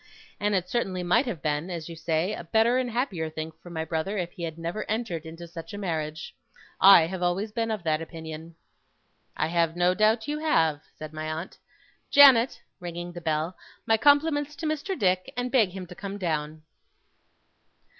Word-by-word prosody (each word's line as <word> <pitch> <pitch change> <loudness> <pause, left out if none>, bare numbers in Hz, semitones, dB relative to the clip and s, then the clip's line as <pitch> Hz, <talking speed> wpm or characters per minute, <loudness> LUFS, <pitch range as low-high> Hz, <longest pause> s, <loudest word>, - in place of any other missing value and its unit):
'And 205 0 +1
it 180 -1 0
certainly 185 -5 -1
might 230 +10 +3
have 180 - -4
been, 150 +3 -1
as 170 -3 -5
you 165 - -8
say, 165 +4 -1
a - - -6
better 225 +8 +3
and 255 -1 -1
happier 215 - -2
thing 155 0 -5
for 175 - -12
my 160 -2 -3
brother 165 +6 -2
if 175 -2 -2
he 180 - -11
had 165 -1 -4
never 170 +6 -3
entered 210 -8 -2
into 165 +1 -9
such 165 +4 -8
a - - -6
marriage. 160 -5 -4 0.5
I 195 -4 +8
have 185 +2 -5
always 185 +4 0
been 225 +1 -1
of 215 -5 -3
that 155 -1 +1
opinion.' 160 0 -8 0.8
'I - - +1
have 165 -1 +1
no 175 +1 +3
doubt 220 +3 +2
you 300 +1 -2
have,' 160 - +2 0.2
said 155 0 -8
my 155 0 -4
aunt. 160 +4 -6 0.5
'Janet,' 270 -4 +7 0.2
ringing 175 -1 -6
the 175 - -8
bell, 160 +2 -1 0.3
'my 225 - +4
compliments 290 +2 +3
to 320 - -6
Mr. 310 +5 -2
Dick, 185 -1 +1
and 245 0 -2
beg 235 -7 +4
him 185 0 -7
to 180 - -11
come 200 +2 -6
down. 155 -4 -3
180 Hz, 190 wpm, -27 LUFS, 160-220 Hz, 0.8 s, I